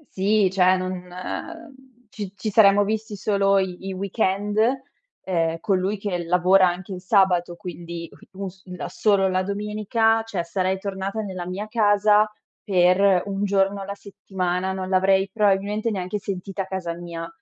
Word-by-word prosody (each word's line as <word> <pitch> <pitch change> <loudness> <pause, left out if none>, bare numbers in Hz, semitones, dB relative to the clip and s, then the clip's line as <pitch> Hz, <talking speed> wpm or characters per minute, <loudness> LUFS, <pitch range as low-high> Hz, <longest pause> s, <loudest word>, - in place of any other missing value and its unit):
Sì, 200 +1 +3
cioè 185 -1 +4
non 185 -1 -5 1.0
ci 205 -4 -7
ci 210 +3 -3
saremmo 205 -1 +6
visti 215 +1 -3
solo 200 0 +2
i 190 0 -2
i 195 - -3
weekend, 200 +1 -1 0.6
ehm, 165 -3 0
con 195 +1 +1
lui 195 +3 -1
che 190 -3 -3
lavora 180 +2 +4
anche 180 +2 -4
il 180 - -7
sabato, 180 -3 +2
quindi, 170 -2 -7 0.3
u 195 +1 -5
si 190 0 -13
da - - -5
solo 200 -3 +2
la 185 0 +1
domenica 210 +3 0
cioè, 210 -6 -4
sarei 185 +2 -1
tornata 195 +2 -4
nella 185 -4 -6
mia 195 +4 -4
casa 210 -1 +3 0.3
per 185 -1 +3
un 200 0 -3
giorno 195 0 +1
alla 200 +1 -5
settimana, 190 -2 -3
non 190 -1 -4
l'avrei 190 +1 +3
probabilmente 210 +1 +1
neanche 195 -1 -3
sentita 195 0 -4
casa 185 -3 -4
mia, 170 -1 -7
195 Hz, 150 wpm, -23 LUFS, 185-205 Hz, 1.0 s, saremmo